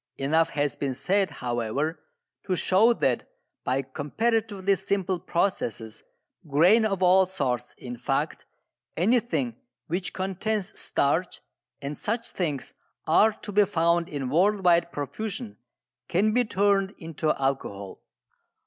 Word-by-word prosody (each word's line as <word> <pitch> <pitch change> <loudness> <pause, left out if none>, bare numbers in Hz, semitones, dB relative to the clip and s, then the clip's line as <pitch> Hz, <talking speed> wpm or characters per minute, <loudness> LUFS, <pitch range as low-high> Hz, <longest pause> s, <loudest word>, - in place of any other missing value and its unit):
Enough 160 +4 +2
has 145 -2 -1
been 135 -2 -2
said, 195 +5 +1
however, 125 +4 -2 0.5
to 185 - +1
show 195 +6 +4
that 235 - 0 0.3
by 130 +2 0
comparatively 200 - 0
simple 190 -1 -1
processes 115 - -2 0.5
grain 175 +11 +5
of 195 -3 0
all 185 +1 +5
sorts, 125 -9 -2
in 125 -1 -7
fact, - - -2 0.5
anything 240 +5 +1 0.3
which 180 +2 -2
contains 195 +2 -2
starch, 160 +6 0 0.4
and 140 +2 -3
such 230 +2 -2
things 150 -7 -3 0.3
are 210 +7 +5
to 210 0 -9
be 205 +1 +5
found 170 -2 +1
in 135 -4 -4
worldwide 175 -1 +3
profusion, 210 - -5 0.5
can 210 +5 +2
be 245 +1 +3
turned 200 -1 +1
into 160 -1 -4
alcohol. 115 -8 -3
180 Hz, 120 wpm, -26 LUFS, 145-205 Hz, 0.5 s, grain